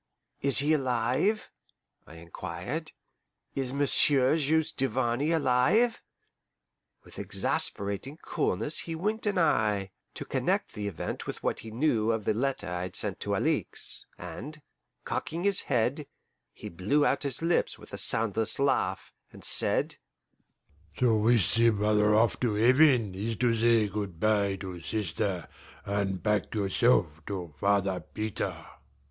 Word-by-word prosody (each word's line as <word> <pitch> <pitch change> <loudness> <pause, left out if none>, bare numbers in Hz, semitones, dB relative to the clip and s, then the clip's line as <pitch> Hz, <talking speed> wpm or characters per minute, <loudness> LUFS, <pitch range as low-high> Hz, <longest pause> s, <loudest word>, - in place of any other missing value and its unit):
"Is 140 -1 +3
he 145 +3 +4
alive?" 130 - 0 0.6
I 80 - -13
inquired. 90 - -6 0.6
"Is 135 -2 -2
Monsieur 140 0 +3
Juste 160 0 +1
Duvarney 130 +1 0
alive?" 165 - +2 1.0
With - - -12
exasperating 100 +9 -1
coolness 150 - -1
he 165 - -5
winked 210 +6 -2
an 205 -2 0
eye, 105 - +1 0.2
to - - -6
connect - - -1
the 105 -1 -4
event 90 -6 -5
with - - -6
what - - -1
he 110 - -9
knew 115 -2 +1
of 110 -2 -2
the - - +2
letter 135 +5 -2
I 90 0 -3
had 90 0 -5
sent - - 0
to - - -2
Alixe, - - 0
and, 150 +4 -8 0.4
cocking 165 +3 -3
his 200 -1 +4
head, 135 +3 -1 0.4
he - - -10
blew 105 - +1
out - - +1
his 140 +2 +3
lips 170 +1 +1
with - - -15
a - - -3
soundless 110 0 0
laugh, 95 -9 0 0.2
and - - -14
said: - - +3 1.0
"To 120 -3 +3
whisk 110 -1 +2
the 115 0 +5
brother 105 0 +2
off 115 +1 +2
to 115 -4 0
heaven 125 -2 +4
is 110 +4 -3
to 120 +1 +1
say 115 -1 +3
good 100 -4 -5
bye 100 -2 +2
to 90 -3 -7
sister 90 0 -3 0.4
and 100 -2 -2
pack 105 -1 0
yourself 95 -5 +1
to 90 -6 -5
Father 100 -2 +1
Peter." 105 -4 -4
115 Hz, 140 wpm, -28 LUFS, 100-140 Hz, 1.0 s, the